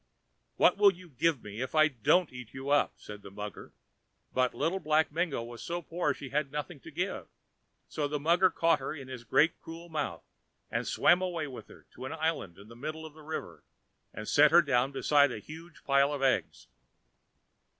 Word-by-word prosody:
"What - - +4
will 205 -1 +7
you 180 -1 -14
give 150 0 0
me 105 +3 -7
if 130 +4 -4
I 155 0 +6
don't 150 +5 +2
eat 125 -2 -10
you 135 +2 -4
up?" 145 - +3
said 105 0 -10
the 100 - -10
mugger. 105 +1 -8 0.6
But 125 -2 +1
Little 170 +9 0
Black 155 -2 +2
Mingo 160 -6 -1
was 120 0 -9
so 175 +1 -4
poor 165 -1 -1
she 140 -1 -7
had 140 0 -1
nothing 150 +1 -5
to 165 - -12
give. 175 +6 -3 0.6
So 150 -2 -2
the 150 0 -2
mugger 170 +5 +4
caught 165 -2 +2
her 135 +3 -4
in 135 -3 -9
his 125 -2 -7
great 150 +8 +2
cruel 165 +1 -10
mouth 145 - -3 0.5
and - - -2
swam 180 +1 +4
away 175 -4 -2
with 135 -4 -9
her - - -16
to 130 - -9
an 130 - -5
island 160 - -2
in 100 +2 -14
the 115 - -13
middle 155 +5 -6
of 155 - -10
the 155 - -15
river, 155 +1 -6 0.5
and 110 - -8
set 150 +1 +6
her 170 +2 +6
down 135 -1 +1
beside 145 0 +3
a - - -4
huge 160 +9 -12
pile 140 +1 +3
of 140 -2 -3
eggs. 135 - 0
150 Hz, 200 wpm, -30 LUFS, 130-165 Hz, 0.6 s, will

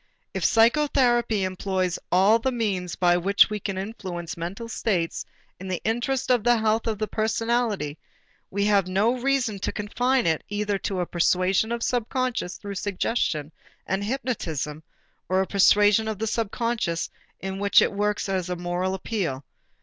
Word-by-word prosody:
If - - -3
psychotherapy 240 -3 +3
employs 185 -1 -1
all 195 +5 +5
the 265 +3 0
means 195 -7 -2
by 175 -1 +3
which 200 +4 +4
we 210 - -2
can 195 -1 -4
influence 185 -4 -5
mental 180 +7 -5
states 185 -7 -1 0.3
in 190 - -7
the 185 -2 -2
interest 240 +4 0
of 245 -4 +3
the 240 0 +4
health 220 +1 +1
of 220 -2 -1
the 215 - -1
personality, 220 -8 -1 0.5
we 200 +1 0
have 200 -3 +3
no 205 +6 +2
reason 255 -5 0
to - - -2
confine 245 +5 0
it 160 -2 +1
either 205 -1 -1
to 190 -2 -2
a - - 0
persuasion 185 +5 +1
of 235 0 -2
the - - 0
subconscious 245 -4 -1
through 200 -1 -7
suggestion 180 -6 -1 0.3
and 195 +1 -1
hypnotism 190 - -3 0.5
or 185 +1 +2
a 190 - +2
persuasion 205 +2 +4
of 220 -2 -2
the 220 +1 -1
conscious, 230 -8 -1 0.3
in 190 0 -5
which 200 0 +5
it - - +2
works 205 +1 -1
as 185 -2 -2
a 180 - -1
moral 175 +2 -2
appeal. 180 -9 -3
205 Hz, 165 wpm, -25 LUFS, 185-230 Hz, 0.5 s, all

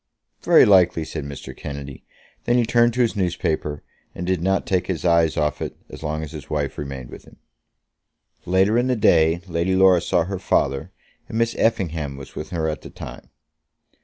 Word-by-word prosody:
"Very - - +6
likely," 90 -5 +4
said 75 -2 -6
Mr. 70 -1 -8
Kennedy. 70 -1 -8 0.4
Then 120 +1 +3
he 120 - +3
turned 120 +1 +3
to 125 - +2
his 115 -2 +1
newspaper, 80 -5 -2 0.3
and 90 - -5
did 90 -2 0
not 95 +2 +1
take 90 -2 0
his 90 -4 -3
eyes 85 -2 +3
off 75 -1 0
it - - -5
as - - -10
long 80 0 -3
as 75 - -7
his 75 -3 -9
wife 75 -3 -2
remained 70 -3 -6
with - - -11
him. - - -17 1.1
Later 95 +6 +3
in 125 - +1
the 130 - +1
day 80 -5 +3
Lady 85 +1 0
Laura 95 -2 +5
saw 85 0 +1
her 95 +2 -4
father, 70 -7 0 0.4
and 110 - -4
Miss 115 0 +1
Effingham 85 -11 -1
was 70 - -11
with 75 - -6
her 85 -3 -2
at 75 -4 -3
the - - -10
time. - - -10
85 Hz, 190 wpm, -22 LUFS, 75-95 Hz, 1.1 s, Very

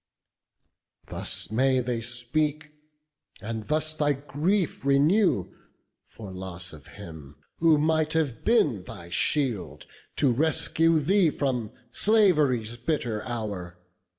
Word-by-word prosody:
Thus - - -2
may 130 +3 +2
they 120 -2 -2
speak; 145 +6 0 0.7
and 110 0 -6
thus 155 +1 0
thy 150 -2 +1
grief 150 +7 -1
renew 140 - +2 0.5
For 100 -4 -10
loss 90 -2 -7
of 75 -3 -13
him, 75 -4 -10 0.2
who 160 -2 +5
might 155 +1 +1
have 150 -8 -1
been 150 - +2
thy 85 -1 -10
shield 120 - -1 0.3
To 140 - +2
rescue 160 +4 +2
thee 175 +4 +3
from 125 -7 -2 0.2
slav'ry's 150 - +2
bitter 120 -4 -2
hour. 100 -7 -5
135 Hz, 110 wpm, -26 LUFS, 110-155 Hz, 0.7 s, who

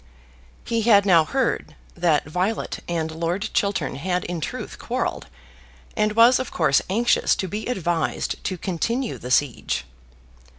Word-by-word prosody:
He 230 -1 0
had 205 -3 +5
now 170 -5 +6
heard 265 +6 -1 0.2
that 170 -4 +1
Violet 180 +8 -2
and 160 -2 -2
Lord 170 +6 -2
Chiltern 175 -10 0
had 180 +4 -1
in 175 -2 -4
truth - - -5
quarrelled, - - -3 0.7
and 210 0 +1
was 235 +3 +6
of 260 - -3
course 150 -5 +2
anxious 230 +5 +2
to 190 - -3
be 210 +4 -4
advised 175 -9 -1
to 185 - -2
continue 225 +8 -2
the 125 - -7
siege. 130 -1 0
185 Hz, 140 wpm, -23 LUFS, 165-220 Hz, 0.7 s, now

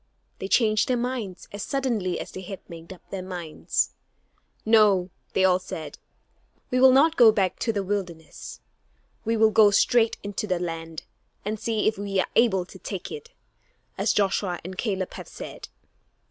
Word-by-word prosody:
They 190 - -4
changed 215 0 +3
their 250 - +1
minds 235 -7 -4
as 205 - -6
suddenly 230 -8 -1
as - - -7
they 185 - -7
had 190 +1 -9
made 165 0 -10
up 185 - -13
their 195 - -4
minds. 175 -4 -2 0.7
"No," 205 -5 +4 0.2
they 190 - +3
all 185 -1 +4
said, 155 -5 -7 0.7
"we 255 - +2
will 265 0 +8
not 305 +5 +5
go 235 -3 +8
back 195 -4 0
to 230 - 0
the 200 -2 -2
wilderness; 180 -5 -5 0.6
we 225 +1 +1
will 220 0 +5
go 215 -1 +6
straight 225 +3 +3
into 205 +1 -4
the 185 -2 +1
land, 165 -2 -5 0.4
and 215 +1 -2
see 225 -1 0
if 215 -1 0
we 200 -1 -1
are - - +2
able 200 -6 +3
to 190 - -13
take 190 -1 -6
it, 450 +1 -8 0.7
as - - +1
Joshua 195 -3 0
and 185 +2 -7
Caleb 190 -3 -2
have - - -8
said." - - -9
200 Hz, 175 wpm, -25 LUFS, 185-225 Hz, 0.7 s, will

